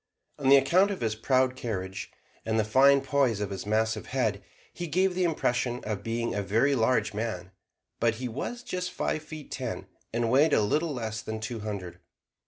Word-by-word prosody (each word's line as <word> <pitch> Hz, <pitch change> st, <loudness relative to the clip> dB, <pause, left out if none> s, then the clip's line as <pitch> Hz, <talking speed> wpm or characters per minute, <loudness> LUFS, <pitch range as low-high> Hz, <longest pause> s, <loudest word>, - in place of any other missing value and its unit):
On 135 Hz, -1 st, +3 dB
account 155 Hz, +9 st, +6 dB
of 200 Hz, -, -4 dB
his 110 Hz, -2 st, 0 dB
proud 130 Hz, +3 st, +2 dB
carriage, 95 Hz, -6 st, -4 dB, 0.3 s
and 110 Hz, 0 st, 0 dB
the -, -, +3 dB
fine 135 Hz, +6 st, +5 dB
poise 135 Hz, -5 st, +1 dB
of 100 Hz, -1 st, -3 dB
his 95 Hz, +1 st, -5 dB
massive 110 Hz, 0 st, 0 dB
head, 110 Hz, -6 st, -1 dB, 0.3 s
he 175 Hz, -, -5 dB
gave 185 Hz, +4 st, +2 dB
the 185 Hz, +1 st, 0 dB
impression 125 Hz, -7 st, 0 dB
of 105 Hz, -2 st, -3 dB
being 115 Hz, +1 st, -2 dB
a 100 Hz, -, -1 dB
very 115 Hz, +8 st, +2 dB
large 125 Hz, -2 st, +2 dB
man; 105 Hz, -4 st, -4 dB, 0.5 s
but 115 Hz, -1 st, +2 dB
he 125 Hz, +2 st, -4 dB
was 240 Hz, -, -5 dB
just 180 Hz, -4 st, -3 dB
five 155 Hz, -, -2 dB
feet 155 Hz, -1 st, -10 dB
ten, -, -, -4 dB, 0.3 s
and 115 Hz, 0 st, 0 dB
weighed 145 Hz, +4 st, +5 dB
a -, -, +5 dB
little 150 Hz, +10 st, +1 dB
less 110 Hz, -5 st, -4 dB
than 110 Hz, 0 st, -5 dB
two 110 Hz, +1 st, -4 dB
hundred. 95 Hz, -5 st, -6 dB
120 Hz, 190 wpm, -28 LUFS, 110-140 Hz, 0.5 s, account